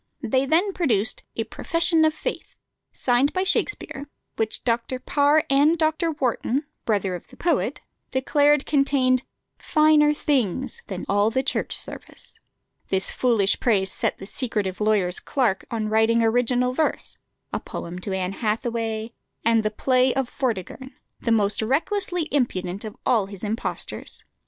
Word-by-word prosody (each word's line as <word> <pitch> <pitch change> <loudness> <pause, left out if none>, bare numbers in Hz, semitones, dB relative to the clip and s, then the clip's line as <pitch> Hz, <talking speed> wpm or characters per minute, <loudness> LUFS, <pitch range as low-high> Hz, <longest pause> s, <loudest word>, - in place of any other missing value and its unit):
They 260 +3 +1
then 360 +7 +2
produced 225 - +2
a 225 - -1
"Profession 330 +7 +1
of 310 - +2
Faith," - - -5 0.4
signed 255 +3 +1
by 370 - 0
Shakspere, 290 -7 -1 0.3
which 220 -1 0
Dr. 235 +1 -1
Parr 290 +4 +2
and 290 +4 +4
Dr. 315 +1 +1
Warton 265 +1 -1 0.2
(brother 200 -4 0
of 175 - -7
the - - -17
poet) 345 - 0 0.3
declared 290 +2 +2
contained 275 -3 +2 0.4
"finer 305 -1 +4
things" 265 - -1
than 190 -2 -5
all 205 +2 +3
the 260 +3 0
Church 275 - +1
Service. - - -5 0.5
This 190 0 0
foolish 225 -6 +2
praise 195 -5 +1
set - - 0
the - - -9
secretive 210 -4 -2
lawyer's 205 -4 +3
clerk 240 -8 0
on 225 -3 -2
writing 220 +2 +3
original 245 +2 +2
verse, 315 +4 -1 0.3
a - - 0
poem 175 +1 -7
to 195 - -4
Anne 190 0 -2
Hathaway, 225 +1 -2 0.3
and 230 -1 +4
the 215 - 0
play 255 +3 +2
of 265 -2 -1
"Vortigern," 260 +2 -4 0.2
the 230 - -1
most 210 -2 +2
recklessly 340 - 0
impudent 195 -9 -1
of 215 -1 -8
all 225 -6 +2
his 200 0 -9
impostures. 215 +2 -4
245 Hz, 145 wpm, -24 LUFS, 215-285 Hz, 0.5 s, and